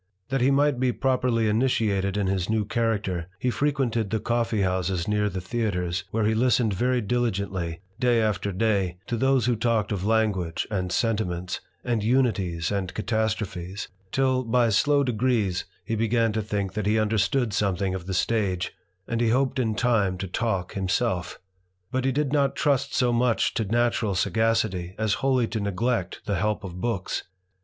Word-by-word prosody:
That 135 -1 0
he 130 - +4
might 140 -1 +3
be 130 -1 +2
pro 130 0 +1
perly 115 -3 +1
initiated 105 -4 +1
in 100 - +1
his 95 -1 -1
new 110 -1 +1
character, 105 -6 -1
he 125 +6 0
frequented 120 -4 0
th( 110 0 -2
coffee 115 -3 0
houses 90 -1 -1
near 105 0 +1
the 95 -1 -4
theatres, 90 -4 -2
where 110 +2 0
he 110 - +3
listened 120 -1 +2
ver] 125 +5 +1
diligently, 100 -7 -1 0.2
day 120 -2 +3
after 100 -3 0
day, 95 -3 0
to 120 - -2
those 135 0 +2
who 120 -1 +2
talked 115 -1 0
of 100 -4 -1
languag< 100 -5 0
and 90 -3 -1
sentiments, 95 -6 -1 0.2
and 120 -3 0
unities 100 -9 +1
and 95 -3 -2
catastrophes, 105 -4 -2 0.2
till, 130 -1 +2
by 120 0 +2
slofl 140 +6 +3
degrees, 115 -6 0 0.2
he - - -3
began 115 0 +1
to 110 - 0
think 100 -2 -2
that 105 0 -2
he 110 +1 +3
understood 110 +2 +1
something 95 -2 0
o - - -2
the 90 +2 -5
stage, 95 -4 0 0.3
and 115 0 -1
hoped 130 +2 +1
in 110 -4 0
time 105 -6 +2
to 95 - -4
talk 95 -2 -2
himself. 95 -2 -1 0.5
But 130 0 -1
he 135 - +3
did 145 +1 0
not 140 -2 +2
trust 140 -3 +1
so 125 -2 +2
much 120 -1 +2
to 110 - -1
natural 115 -1 +1
sagacity 95 -2 0
a^ 110 -2 +1
wholly 130 -3 +2
to 115 - -2
neglect 100 0 -1
the 100 -2 0
help 105 +3 -1
of 90 -1 -7
books. 115 -6 -2
110 Hz, 170 wpm, -25 LUFS, 95-120 Hz, 0.5 s, he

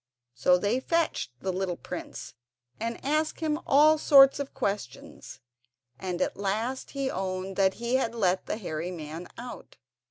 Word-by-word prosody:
So 180 +9 +4
they 205 +7 0
fetched 330 - 0
the 190 -1 -2
little 185 -2 -2
prince - - -7 0.5
and 230 +1 -3
asked 305 +2 0
him 310 -1 0
all 300 +2 +6
sorts 275 -2 +7
of 280 -1 -4
questions, 135 -8 -5 0.6
and 180 -2 -3
at - - -3
last 220 +6 -2
he 270 -1 0
owned 190 0 -3
that 190 -1 +3
he 235 +2 0
had 235 -3 -1
let 190 -4 +1
the - - -2
hairy 170 -4 -4
man 165 0 -7
out. 245 +1 -9
205 Hz, 155 wpm, -28 LUFS, 185-270 Hz, 0.6 s, sorts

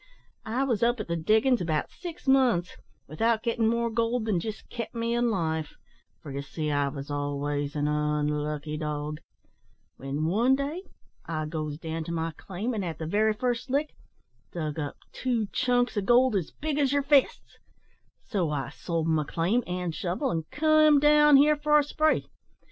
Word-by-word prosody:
"I 240 +5 0
was 240 -6 0
up 240 0 +2
at 215 - -4
the 170 - -1
diggin's 220 +8 +2
about 160 -3 -1
six 350 -3 -9
months, 250 -10 +3 0.3
without 225 +9 0
gittin' 230 -1 +1
more 235 0 +1
gold 230 +1 0
than 205 -6 +1
jist 215 +4 -6
kep' 235 -1 -6
me 230 0 -1
in 240 0 +2
life 160 -6 -2 0.5
for, 145 - -8
ye 140 +1 -4
see, 150 +2 -4
I 145 -1 +1
was 140 0 -6
always 145 0 -2
an 145 0 0
unlucky 150 0 -1
dog 150 0 -4 0.8
when 140 +3 -3
one 230 +10 +3
day 285 +6 -3 0.5
I 155 -2 -2
goes 155 -1 -4
down 160 0 -4
to 170 - -5
my 165 0 -2
claim, 195 +9 -5
and, 210 -3 -2
at 165 -4 -4
the 160 - -5
very 215 +6 +2
first 245 +3 -2
lick, 290 +3 0 0.6
dug 155 -3 -4
up 145 -2 -4
two 240 -4 -1
chunks 245 -1 +1
o' 205 - +1
gold 240 +3 +4
as 180 -5 -1
big 300 -1 -3
as 275 -2 +2
yer 285 0 +2
fists; 280 -1 +2 0.7
so 185 -8 -1
I 145 -2 -2
sold 165 -2 -3
my 160 -1 +2
claim 180 +11 0
and 180 -2 -3
shovel, 175 +3 -2
and 160 -2 -3
came 310 -1 +4
down 295 0 +6
here 300 +2 +5
for 300 0 +3
a 295 - +4
spree. 310 +2 +1
200 Hz, 180 wpm, -27 LUFS, 155-250 Hz, 0.8 s, down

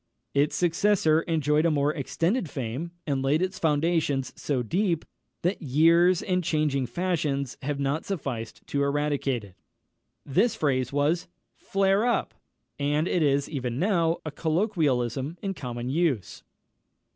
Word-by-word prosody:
Its 145 +1 +2
successor 175 -2 +3
enjoyed 155 -2 +2
a 170 - +3
more 145 -1 +1
extended 170 - -1
fame, 135 +6 -4 0.2
and 140 -3 0
laid 140 +3 +2
its 185 +1 -2
foundations 150 -3 +1
so 130 -4 -1
deep, 175 - 0 0.4
that 180 +4 0
years 165 +5 +4
and 180 -1 0
changing 150 -5 0
fashions 145 -3 -1
have 140 +1 -2
not 140 +3 -1
sufficed 135 - -5
to 140 - -1
eradicate 140 -4 0
it. 100 -3 -13 0.7
This 225 - +2
phrase 130 -4 0
was 145 +5 +1 0.3
"Flare 195 +1 +1
up!" 240 0 0 0.5
and 145 +3 +1
it 180 - +1
is, 140 -2 +2
even 125 -5 -3
now, 170 -2 +2
a 155 - -3
colloquialism 155 - 0
in 195 -1 -1
common 120 -6 -5
use. 135 - 0
150 Hz, 135 wpm, -26 LUFS, 135-170 Hz, 0.7 s, years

